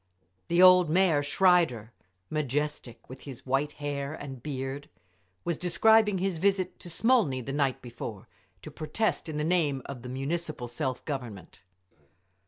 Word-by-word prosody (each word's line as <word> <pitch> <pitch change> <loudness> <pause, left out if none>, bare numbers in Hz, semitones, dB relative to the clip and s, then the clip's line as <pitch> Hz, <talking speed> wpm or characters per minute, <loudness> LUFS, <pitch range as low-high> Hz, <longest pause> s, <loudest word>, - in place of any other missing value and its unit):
The 175 +2 +4
old 180 -2 +7
Mayer, 170 -3 +3
Schreider, 145 - +2 0.4
majestic 150 -4 -3
with 130 +1 -10
his 135 -4 -8
white 135 +3 0
hair 145 0 -4
and 135 -5 -8
beard, 135 0 -5 0.5
was 170 -3 -2
describing 210 +3 +4
his 185 -2 -1
visit 195 -1 0
to 175 - -6
Smolny 205 - +2
the 135 +2 -5
night 140 -3 0
before, 115 -4 -8 0.4
to - - -8
protest 165 +3 -2
in 150 - -4
the 150 - -1
name 155 -6 +1
of 130 -3 -7
the 125 - -8
Municipal 140 0 -3
Self 130 +1 -3
Government. 120 - -6
150 Hz, 145 wpm, -28 LUFS, 130-175 Hz, 0.5 s, old